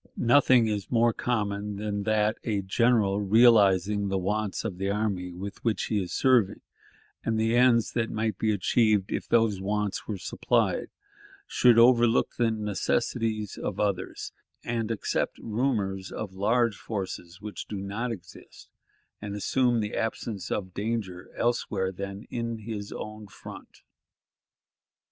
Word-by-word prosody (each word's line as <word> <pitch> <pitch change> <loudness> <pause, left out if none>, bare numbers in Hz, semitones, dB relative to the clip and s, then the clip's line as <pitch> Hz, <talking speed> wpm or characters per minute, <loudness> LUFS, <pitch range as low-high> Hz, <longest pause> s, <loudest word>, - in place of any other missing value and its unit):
Nothing 125 -1 +5
is 105 -2 -3
more 120 -1 +3
common 105 -4 -2
than 105 0 -3
that 110 0 +1
a 105 -4 -1
general, 105 0 +2
realizing 100 -2 +4
the 95 0 0
wants 105 +3 -2
of 95 -5 -4
the 95 0 -1
army 100 -3 -1
with 100 +4 -8
which 115 -2 0
he 105 - +2
is 90 - -5
serving, 120 -7 +2 0.6
and 110 -1 0
the 115 +1 +2
ends 120 -2 +4
that 115 -2 0
might 110 -2 -2
be 110 - +2
achieved 105 0 +2
if - - -3
those 110 -5 +2
wants 105 0 -2
were 105 - -3
supplied, - - 0 0.6
should 120 -2 +4
overlook 120 0 +4
the 120 -1 +3
necessities 105 0 -1
of - - -4
others, 100 -3 -2 0.3
and 115 -2 -2
accept 115 -3 -1
rumors 105 -5 -2
of 100 -3 -5
large 110 +3 +1
forces 95 -4 -6
which 105 0 -7
do 105 - -5
not 105 +5 -3
exist, 90 -7 -11 0.5
and 105 -1 -5
assume 120 +3 +1
the 105 -1 -4
absence 110 -4 -3
of 95 -2 -3
danger 100 -4 -3
elsewhere 105 -5 0
than 100 +2 -6
in 115 -1 -3
his 105 -2 -6
own 110 0 -7
front. 95 - -12
105 Hz, 140 wpm, -27 LUFS, 100-115 Hz, 0.6 s, Nothing